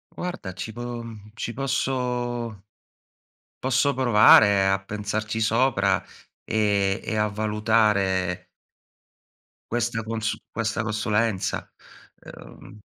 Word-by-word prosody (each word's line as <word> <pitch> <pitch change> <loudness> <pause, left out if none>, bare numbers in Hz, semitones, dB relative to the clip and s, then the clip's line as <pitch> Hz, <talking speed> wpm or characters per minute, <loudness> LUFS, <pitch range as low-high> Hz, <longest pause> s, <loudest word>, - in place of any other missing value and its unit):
Guarda 175 - -5
ci 100 +4 -6
po 120 0 -6 0.3
ci 115 - -4
posso 125 -4 -2 1.0
posso 135 +2 +2
provare 105 -5 +6
a 95 0 +1
pensarci 105 +2 -3
sopra, 110 -4 +2 0.4
ehm, 100 -3 +1
e 110 - -3
a 105 0 +2
valutare 105 -3 +1 1.3
questa 120 -1 -1
consu 110 0 -2 0.2
questa 115 -1 -2
consulenza, 105 -1 -1 0.5
ehm 105 - -13
110 Hz, 90 wpm, -24 LUFS, 100-120 Hz, 1.3 s, provare